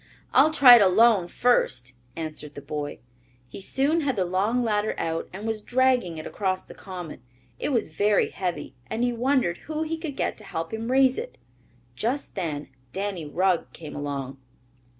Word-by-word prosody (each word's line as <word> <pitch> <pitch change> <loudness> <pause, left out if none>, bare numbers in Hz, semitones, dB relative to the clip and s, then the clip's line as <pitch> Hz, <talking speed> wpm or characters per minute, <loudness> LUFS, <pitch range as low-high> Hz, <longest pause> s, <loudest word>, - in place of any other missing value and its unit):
"I'll 310 - +6
try 255 -5 +9
it - - +4
alone 200 0 +5
first," 130 - +1 0.2
answered 155 -2 -6
the 145 - -7
boy. 145 0 -4 0.5
He 125 - -9
soon 280 +10 +1
had 275 -4 0
the 190 -3 +1
long 205 +7 +1
ladder 215 -1 0
out 165 0 -2
and 200 +4 -7
was 220 -1 -2
dragging 250 -8 +1
it 155 - -7
across 185 -2 -2
the - - -13
common. 180 -8 -8 0.4
It - - -1
was 235 - 0
very 205 +6 +2
heavy 180 -6 -4 0.2
and 235 - -1
he 245 0 +1
wondered 245 -7 +1
who 310 0 -1
he 320 +1 -3
could 315 -4 -6
get - - -2
to - - -13
help 165 -3 -5
him 225 +2 -3
raise 265 -1 +4
it. - - -7 0.6
Just 245 - -2
then 155 -7 -4 0.2
Danny 195 -4 -3
Rugg 180 +2 +1
came 155 -3 -9
along. 140 -2 -4
200 Hz, 175 wpm, -25 LUFS, 165-245 Hz, 0.6 s, try